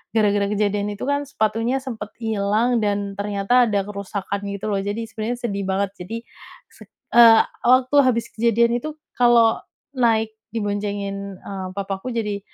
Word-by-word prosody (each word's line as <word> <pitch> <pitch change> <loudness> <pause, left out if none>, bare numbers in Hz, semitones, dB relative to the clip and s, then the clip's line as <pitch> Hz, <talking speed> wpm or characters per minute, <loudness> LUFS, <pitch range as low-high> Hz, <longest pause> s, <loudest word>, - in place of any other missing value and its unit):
gara-gara 205 -2 +3
kejadian 205 0 0
itu - - -15
kan 285 +1 0
sepatunya 230 +1 0
sempet 235 -5 -7
ilang 220 +3 +1
dan 200 -2 -2
ternyata 205 +4 +2
ada 200 -2 0
kerusakan 200 0 -5
gitu 200 +1 -4
loh. 200 - 0
Jadi 205 +3 -3
sebenernya 225 +2 -3
sedih 200 -4 -2
banget. 195 0 0
Jadi 225 +6 -6 0.5
sed - - -16 0.2
eee, 230 -1 +8 0.3
waktu 255 +2 +4
habis 235 -3 0
kejadian 235 +1 +2
itu 305 +4 -6 0.2
kalau 235 -2 +5 0.3
naik 225 -4 +1 0.2
diboncengin, 200 -2 -3
eee, 190 -2 -6
papaku 200 +5 -4
jadi 210 -3 -2
210 Hz, 145 wpm, -22 LUFS, 200-235 Hz, 0.5 s, eee